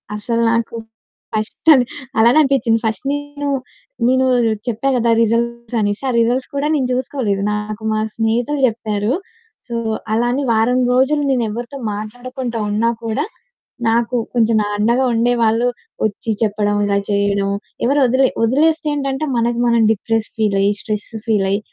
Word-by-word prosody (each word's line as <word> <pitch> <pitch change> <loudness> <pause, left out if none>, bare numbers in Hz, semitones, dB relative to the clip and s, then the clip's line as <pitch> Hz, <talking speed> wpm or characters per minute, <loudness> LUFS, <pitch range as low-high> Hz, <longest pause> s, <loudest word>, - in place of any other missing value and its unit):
అసల 230 +2 -2
నాకు 230 0 -1 0.6
ఫస్ట్ 215 +8 -1
అని 260 -4 +5 0.4
అలానే 235 +5 +5
అనిపిచ్చింది. 265 -5 +2
ఫస్ట్ 220 +6 -2
నేను 290 0 -4 0.6
నేను 260 +1 +3 0.4
చెప్పా 240 +3 -1
గదా! 235 -1 +1
రిజల్ట్స్ 235 +1 -1
అనేసి 205 +3 -1
ఆ - - +1
రిజల్ట్స్ 245 +3 +1
కూడా 280 +1 0
నేను 265 -4 0
చూసుకోలేదు. 250 -6 -1
నాకు 210 +1 -4
మా 215 - 0 0.2
స్నేహితుడు 235 +6 0
జెప్పారు. 215 -2 -1 0.5
సో, 240 - -8 0.4
అలా 235 +2 +2
అని 275 +3 -1
వారం 230 +3 +2
రోజులు 275 +4 +2
నేను 250 -3 +1
ఎవరితో 240 +5 -6 0.2
మాట్లాడకుండా 240 +3 -5
ఉన్నా 215 +3 +1
కూడా 230 +6 -1 0.6
నాకు 235 +2 +1 0.2
కొంచెం 230 -2 +3 0.2
అండగా 235 +5 +2
ఉండేవాళ్ళు 235 0 +2 0.4
ఒచ్చి 220 +1 -2
చెప్పడం 205 -1 +1
ఇలా 200 0 +1
చేయడం 200 -1 +1 0.4
ఎవరు 280 +4 +2
ఒదిలే 260 +2 +3 0.2
ఒదిలేస్తేంటంటే 290 +1 +1
మనకి 235 0 0
మనం 235 -1 +3
డిప్రెస్ 225 +1 -1
ఫీలయ్యి, 200 -2 +2
స్ట్రెస్ 210 -1 -4 0.2
ఫీలయ్యి 200 -2 +1
235 Hz, 135 wpm, -18 LUFS, 215-255 Hz, 0.6 s, అని